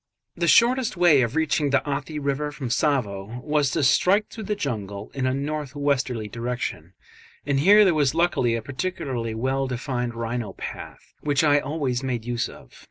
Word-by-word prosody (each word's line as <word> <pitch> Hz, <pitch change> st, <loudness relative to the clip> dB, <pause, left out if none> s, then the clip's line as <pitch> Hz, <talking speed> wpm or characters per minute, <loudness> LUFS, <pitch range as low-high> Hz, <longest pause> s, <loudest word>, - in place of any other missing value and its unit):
The 170 Hz, 0 st, -1 dB
shortest 240 Hz, +1 st, +4 dB
way 170 Hz, -6 st, +5 dB
of 120 Hz, +2 st, -1 dB
reaching 155 Hz, -2 st, +1 dB
the 140 Hz, -, +1 dB
Athi 145 Hz, +2 st, -3 dB
river 145 Hz, +1 st, -2 dB
from 135 Hz, -4 st, -5 dB
Tsavo 115 Hz, -5 st, -1 dB
was 150 Hz, -2 st, +1 dB
to 155 Hz, +2 st, -1 dB
strike 195 Hz, +10 st, +3 dB
through 220 Hz, -2 st, -7 dB
the 210 Hz, -, -1 dB
jungle 105 Hz, -, -4 dB
in 130 Hz, -2 st, -1 dB
a 130 Hz, -, +1 dB
north 145 Hz, 0 st, -4 dB
westerly 135 Hz, -6 st, -1 dB
direction, 115 Hz, -7 st, -4 dB, 0.5 s
and 140 Hz, -1 st, +1 dB
here 205 Hz, +7 st, +7 dB
there 185 Hz, -, +4 dB
was 145 Hz, -2 st, +1 dB
luckily 165 Hz, -9 st, +2 dB
a 115 Hz, -, -4 dB
particularly 130 Hz, -5 st, -3 dB
well 135 Hz, +3 st, -1 dB
defined 125 Hz, -1 st, -3 dB
rhino 115 Hz, -3 st, -3 dB
path -, -, -9 dB
which 145 Hz, 0 st, +1 dB
I 145 Hz, -1 st, +5 dB
always 140 Hz, -4 st, -2 dB
made 125 Hz, -4 st, -3 dB
use 120 Hz, -1 st, -1 dB
of. -, -, -15 dB
135 Hz, 175 wpm, -24 LUFS, 120-150 Hz, 0.5 s, here